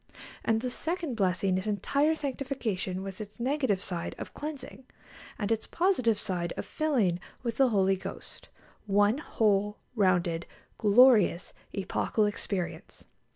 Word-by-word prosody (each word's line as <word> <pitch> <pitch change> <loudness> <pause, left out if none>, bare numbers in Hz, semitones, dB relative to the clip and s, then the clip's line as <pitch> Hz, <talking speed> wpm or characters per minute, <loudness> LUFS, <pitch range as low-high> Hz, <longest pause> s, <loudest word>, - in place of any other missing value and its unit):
And 225 0 +2
the 250 0 -2
second 330 0 -2
blessing 185 -2 +1
is 190 - -6
entire 280 - +1
sanctification, 255 -10 -3
with 195 +1 -6
its 210 +1 -10
negative 255 -6 0
side 170 -2 -4
of - - -7
cleansing, 285 -3 -7 0.5
and 210 0 -2
its 225 -1 0
positive 295 - +2
side 180 -5 -3
of - - -3
filling 235 - +1 0.2
with 235 -2 -2
the 270 -2 +5
Holy 195 -3 +3
Ghost 185 - -9 0.4
one 205 +5 +3
whole, 210 -7 +1 0.2
rounded, 175 -5 +2 0.3
glorious, 215 -4 +5 0.2
epochal 200 +2 0
experience. 200 -3 -4
210 Hz, 130 wpm, -29 LUFS, 190-260 Hz, 0.5 s, the